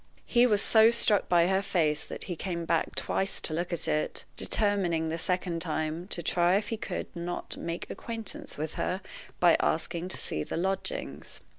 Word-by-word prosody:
He 245 0 +5
was 210 -3 +2
so 220 0 +6
struck 230 -3 +3
by 170 -1 +5
her 190 +2 +2
face 160 -6 +1
that - - -7
he 180 - -4
came 170 -1 -3
back 165 0 0
twice 195 0 -1
to 155 - -1
look 175 +3 -2
at 170 - -1
it, 155 - -1
determining, 185 -6 +1
the 165 +1 -2
second 180 -1 -1
time, 160 +1 -2
to 175 -4 -4
try 175 +3 +3
if 205 +1 0
he 225 - -1
could - - -5
not 175 +1 -4
make 170 0 -4
acquaintance 235 +6 -6
with 155 +1 -3
her 185 +2 -1 0.4
by 175 -2 +6
asking 170 +2 0
to 185 - -2
see 75 - -2
the - - -4
lodgings. 195 - -3
175 Hz, 185 wpm, -29 LUFS, 165-200 Hz, 0.4 s, so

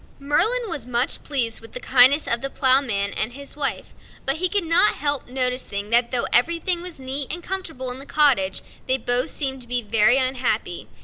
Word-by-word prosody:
Merlin 440 - +2
was 290 - -5
much 250 +2 0
pleased 235 -7 0
with 225 - -14
the - - -5
kindness 260 +4 +5
of 235 0 0
the 275 - -4
Ploughman 255 -8 +1
and 235 - -4
his 280 +1 -10
wife; 290 -2 -4 0.3
but 270 +3 +1
he 365 +2 -1
could 405 -1 +2
not 335 +5 +4
help 285 -1 -2
noticing 250 -5 -2
that 235 0 +3
though 250 -2 -1
everything 335 +6 +1
was 355 -4 -5
neat 265 +1 -4
and 345 +1 -6
comfortable 325 -10 -4
in 250 - -8
the 275 - -11
cottage, 250 -11 +1 0.2
they 260 - +2
both 245 +1 0
seemed 265 -3 -1
to 240 - -9
be 245 0 -2
very 220 +4 +3
unhappy. 245 -8 -2
260 Hz, 195 wpm, -21 LUFS, 240-295 Hz, 0.3 s, kindness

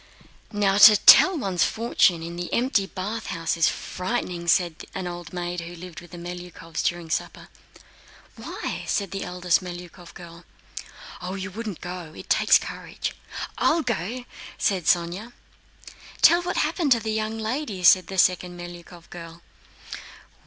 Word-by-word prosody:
"Now 205 -2 +1
to 210 0 +10
tell 305 - +8
one's 190 - 0
fortune 190 -7 +2
in 170 +1 -6
the 175 0 -5
empty 235 -5 +1
bathhouse 190 -4 -3
is 165 - +3
frightening!" 180 -3 -4
said 170 -2 +1
an 190 - -4
old 175 -1 -7
maid 175 -1 -4
who 170 +1 -9
lived 175 -1 -10
with 175 - -15
the 175 - -10
Melyukóvs, 175 -2 -7
during 175 -2 -2
supper. - - -4 0.9
"Why?" - - -6
said 200 -3 -1
the 195 - -4
eldest 180 0 0
Melyukóv 175 -1 -10
girl. 170 0 -12 0.8
"You 190 +2 -5
wouldn't 210 -2 -6
go, 175 -3 -7
it - - -9
takes - - +5
courage...." - - -6 0.5
"I'll 325 0 +2
go," 235 +2 -3 0.3
said 185 -5 0
Sónya. 175 +7 0 0.9
"Tell 345 +1 +7
what 360 +1 -3
happened 320 -7 0
to 235 - -1
the 220 0 -3
young 220 0 -2
lady!" 220 -3 -3
said 185 0 +6
the 190 - -6
second 180 -1 +2
Melyukóv 175 -1 -11
girl. 170 -1 -10
180 Hz, 145 wpm, -24 LUFS, 175-215 Hz, 0.9 s, to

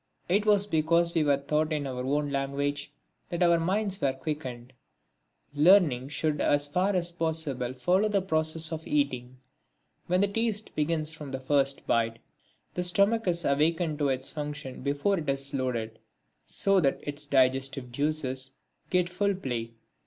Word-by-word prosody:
It 205 +4 +2
was 205 -1 +4
because 170 -1 +2
we 165 - +2
were 145 -2 +3
taught 150 +3 -1
in 150 -2 -1
our 125 -2 -4
own 145 +2 0
language 140 +1 -2 0.4
that 175 0 0
our 170 -1 +4
minds 195 +3 0
quickened. 130 -3 -3 0.8
Learning 150 -5 +4
should 150 0 -1
as 145 0 +2
far 185 +6 +1
as 175 -1 0
possible 155 -7 -2
follow 185 +10 +2
the 200 -2 +1
process 160 -2 0
of 160 0 -5
eating. 130 -4 -1 0.7
When 180 +2 +2
the 200 - +4
taste 220 0 -2
begins 155 0 0
from 150 -3 -8
the 135 0 -4
first 135 0 +1
bite, 115 -1 +1 0.6
the 180 - -2
stomach 200 +5 +2
is 170 -1 +1
awakened 155 +2 +1
to 145 -2 +2
its 130 0 -1
function 145 -3 -6
before 145 +8 0
it 150 -3 -4
is 135 0 -1
loaded, 115 -4 -2 0.5
so 195 -1 +3
that 140 -6 +1
its 145 0 -4
digestive 135 -1 +1
juices 135 -1 -2 0.4
get 180 -1 +2
full 200 +2 0
play. 120 -9 -4
150 Hz, 155 wpm, -28 LUFS, 135-175 Hz, 0.8 s, was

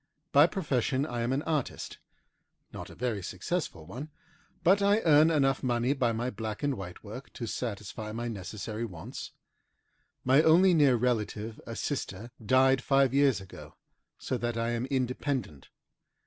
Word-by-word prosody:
By 145 +3 +7
profession 140 - 0
I 120 -5 -3
am 120 +2 0
an 140 +3 0
artist, 155 -5 -3 0.7
not - - -7
a - - -12
very 115 -5 -2
successful 90 - -4
one, 125 - -7 0.5
but 195 +4 +5
I 200 +2 +4
earn 155 -2 +6
enough 135 -4 +2
money 125 0 +1
by 125 -4 +1
my 120 +3 -2
black 110 +1 -5
and 145 -2 +1
white 90 -3 -8
work 110 +6 -9
to 120 - -5
satisfy 105 -2 -5
my 120 +2 -4
necessary 105 +1 -5
wants. 100 +3 -7 0.9
My 130 +3 +6
only 175 +4 +6
near 145 -6 +5
relative, 110 -2 -1
a 115 - -5
sister, 115 -5 -4
died 130 +3 +4
five 135 -2 +3
years 140 -5 +4
ago, 95 - -12 0.4
so 125 - -3
that 120 -1 -2
I 115 +1 0
am 120 +2 -2
independent. 130 - -2
125 Hz, 155 wpm, -29 LUFS, 110-140 Hz, 0.9 s, By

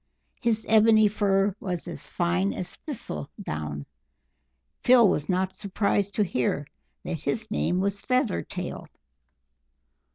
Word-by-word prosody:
His 225 -2 0
ebony 220 0 +6
fur 200 -1 +1
was 180 -3 -3
as 170 - -1
fine 180 +3 0
as 180 - -4
thistle 145 - -6
down; 75 -2 -4 0.9
Phil 245 -3 +6
was 150 -3 0
not 185 0 0
surprised 200 0 0
to 210 - +3
hear 145 - -1 0.4
that - - -4
his - - -3
name 75 - +1
was 200 +1 -1
"Feathertail." 250 - -2
195 Hz, 120 wpm, -26 LUFS, 170-215 Hz, 0.9 s, ebony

